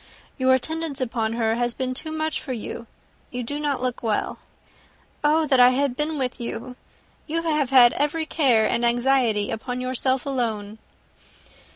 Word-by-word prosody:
"Your 260 Hz, 0 st, +5 dB
attendance 315 Hz, +2 st, -3 dB
upon 230 Hz, -3 st, -1 dB
her 225 Hz, -1 st, +1 dB
has 240 Hz, -1 st, 0 dB
been 255 Hz, -1 st, -2 dB
too 315 Hz, +5 st, -2 dB
much 315 Hz, 0 st, -2 dB
for 265 Hz, -, -5 dB
you. 235 Hz, 0 st, -6 dB, 0.4 s
You 250 Hz, 0 st, -4 dB
do 290 Hz, +5 st, -4 dB
not 285 Hz, -4 st, -1 dB
look 250 Hz, -1 st, -2 dB
well. 220 Hz, -3 st, -1 dB, 0.8 s
Oh 310 Hz, +2 st, +3 dB
that 265 Hz, -3 st, +3 dB
I 245 Hz, 0 st, +8 dB
had 260 Hz, 0 st, 0 dB
been 300 Hz, +2 st, -1 dB
with 255 Hz, -3 st, -3 dB
you! 235 Hz, +1 st, -5 dB, 0.5 s
you 330 Hz, +2 st, -1 dB
have 300 Hz, -5 st, 0 dB
had 250 Hz, -3 st, +7 dB
every 295 Hz, +2 st, -1 dB
care 255 Hz, -9 st, +3 dB
and 235 Hz, -, 0 dB
anxiety 240 Hz, -3 st, +2 dB
upon 245 Hz, +3 st, -4 dB
yourself 255 Hz, +1 st, -1 dB
alone." 220 Hz, -6 st, -3 dB
255 Hz, 165 wpm, -24 LUFS, 235-290 Hz, 0.8 s, I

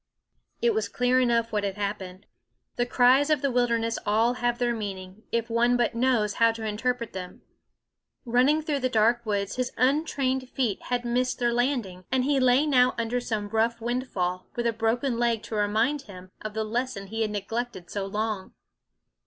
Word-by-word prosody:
It 475 Hz, -1 st, +4 dB
was 440 Hz, -, -1 dB
clear 250 Hz, +1 st, +2 dB
enough 235 Hz, -2 st, +2 dB
what 210 Hz, -1 st, 0 dB
had 195 Hz, -1 st, -2 dB
happened. 200 Hz, -2 st, -5 dB, 0.5 s
The 245 Hz, 0 st, 0 dB
cries 260 Hz, +4 st, +4 dB
of 300 Hz, -3 st, +2 dB
the 275 Hz, -, +2 dB
wilderness 235 Hz, -2 st, +1 dB
have -, -, -17 dB
all 225 Hz, +4 st, +3 dB
their 240 Hz, 0 st, 0 dB
meaning, 195 Hz, -2 st, -6 dB
if 230 Hz, -1 st, 0 dB
one 240 Hz, +1 st, +2 dB
but 240 Hz, -1 st, +1 dB
knows 230 Hz, -4 st, +1 dB
how 230 Hz, 0 st, +6 dB
to 225 Hz, -1 st, -6 dB
interpret 235 Hz, +2 st, -2 dB
them. 180 Hz, -1 st, -8 dB, 0.8 s
Running 255 Hz, +6 st, +3 dB
through 295 Hz, -2 st, -1 dB
the 255 Hz, -1 st, 0 dB
dark 235 Hz, +1 st, +3 dB
woods, 200 Hz, 0 st, -1 dB
his 255 Hz, 0 st, -1 dB
untrained 265 Hz, -1 st, +1 dB
feet 240 Hz, -8 st, -1 dB
had 245 Hz, -1 st, -1 dB
missed 250 Hz, +1 st, 0 dB
their 240 Hz, -1 st, +1 dB
landing, 240 Hz, -8 st, -1 dB
and 260 Hz, -1 st, +2 dB
he 275 Hz, +1 st, +2 dB
lay 255 Hz, +3 st, +4 dB
now 255 Hz, -4 st, +4 dB
under 230 Hz, +2 st, -1 dB
some 215 Hz, -4 st, -3 dB
rough 225 Hz, +2 st, +1 dB
windfall, 225 Hz, -7 st, -2 dB
with 240 Hz, -, -2 dB
a 235 Hz, -, +2 dB
broken 230 Hz, +3 st, 0 dB
leg 235 Hz, -2 st, +1 dB
to -, -, -8 dB
remind 220 Hz, +8 st, +1 dB
him 185 Hz, -5 st, -12 dB
of 215 Hz, 0 st, -6 dB
the 220 Hz, -, 0 dB
lesson 230 Hz, -1 st, -3 dB
he 225 Hz, +3 st, -4 dB
had 220 Hz, -, +1 dB
neglected 210 Hz, -2 st, -4 dB
so 200 Hz, -1 st, -3 dB
long. 210 Hz, -1 st, -3 dB
235 Hz, 185 wpm, -26 LUFS, 210-250 Hz, 0.8 s, how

